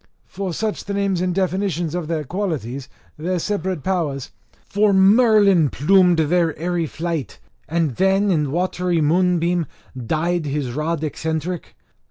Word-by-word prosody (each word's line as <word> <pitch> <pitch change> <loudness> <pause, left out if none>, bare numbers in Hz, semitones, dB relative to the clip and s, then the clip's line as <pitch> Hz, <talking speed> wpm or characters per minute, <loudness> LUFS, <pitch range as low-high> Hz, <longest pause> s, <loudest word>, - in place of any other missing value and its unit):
[for 195 -2 -5
such 215 +5 -3
the 200 - -3
names 195 -3 0
and 180 -1 -1
definitions 185 -4 -1
of 175 -3 -3
their 160 -2 -2
qualities, 140 - -4 0.3
their 180 +4 -2
separate 185 -4 -2
powers.] 155 -8 -2 0.3
For 205 0 +2
Merlin 200 - +5
plumed 180 +5 +4
their 160 0 +1
airy 170 0 -1
flight, 160 - -4 0.3
and 165 -7 0
then 195 +1 +3
in 150 -5 +1
watery 180 +1 0
moonbeam 175 +1 +2 0.3
dyed 155 +6 -1
his 140 -3 -2
rod 155 +4 -2
eccentric. 160 +3 -3
175 Hz, 135 wpm, -21 LUFS, 155-190 Hz, 0.3 s, Merlin